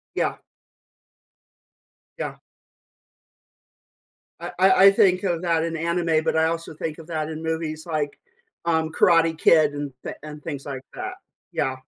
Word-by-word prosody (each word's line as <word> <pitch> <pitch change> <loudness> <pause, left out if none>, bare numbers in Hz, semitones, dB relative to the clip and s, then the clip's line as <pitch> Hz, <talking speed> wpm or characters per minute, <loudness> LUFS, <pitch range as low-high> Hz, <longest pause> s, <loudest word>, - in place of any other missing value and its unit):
Yeah. - - 0 1.8
Yeah. - - -4 2.0
I - - -5
I 190 +1 +6 0.2
I - - +10
think 185 -2 +4
of 175 -4 -1
that 165 -2 +1
in 165 0 -2
anime, 165 -1 +1
but - - +1
I 160 0 +4
also 165 0 -3
think 155 0 -5
of 165 - -11
that 155 -2 -2
in 160 0 -6
movies 160 -1 -3
like, 155 -3 -2 0.5
um, 160 -1 +1
Karate 165 -1 +4
Kid 155 -3 +5
and 145 -1 -4
thi - - -4
and 150 0 -9
things 140 -3 -6
like 135 -2 -5
that, 370 0 -5 0.4
yeah. 130 0 -1
160 Hz, 145 wpm, -24 LUFS, 155-170 Hz, 2.0 s, I